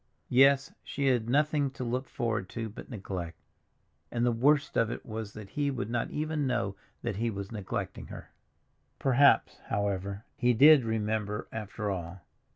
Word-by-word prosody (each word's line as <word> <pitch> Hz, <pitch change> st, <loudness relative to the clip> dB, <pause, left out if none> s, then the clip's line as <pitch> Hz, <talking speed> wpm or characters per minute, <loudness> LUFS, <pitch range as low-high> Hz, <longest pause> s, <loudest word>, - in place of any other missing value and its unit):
Yes, 135 Hz, +2 st, +5 dB
she 140 Hz, -, -3 dB
had 120 Hz, -3 st, +1 dB
nothing 145 Hz, +1 st, +2 dB
to 130 Hz, -1 st, -7 dB
look 125 Hz, +2 st, -2 dB
forward 105 Hz, -5 st, -2 dB
to 115 Hz, -1 st, -4 dB
but 105 Hz, -, -10 dB
neglect—and 95 Hz, -, -7 dB
the 120 Hz, -, +3 dB
worst 140 Hz, +5 st, +2 dB
of 115 Hz, -, +3 dB
it -, -, -6 dB
was 110 Hz, -2 st, -6 dB
that 105 Hz, -2 st, -9 dB
he 145 Hz, -1 st, 0 dB
would 120 Hz, -5 st, -3 dB
not 120 Hz, -1 st, -1 dB
even 150 Hz, -1 st, -1 dB
know 115 Hz, -6 st, -1 dB, 0.3 s
that -, -, -2 dB
he 115 Hz, +2 st, 0 dB
was 100 Hz, -1 st, -5 dB
neglecting 105 Hz, -4 st, -4 dB
her. -, -, -10 dB, 0.7 s
Perhaps, 135 Hz, +1 st, +4 dB
however, 100 Hz, 0 st, -2 dB
he 125 Hz, -3 st, +2 dB
did 145 Hz, +1 st, +8 dB
remember 105 Hz, -1 st, -1 dB
after 105 Hz, -1 st, -4 dB
all. 90 Hz, 0 st, -5 dB
115 Hz, 160 wpm, -30 LUFS, 105-135 Hz, 0.7 s, did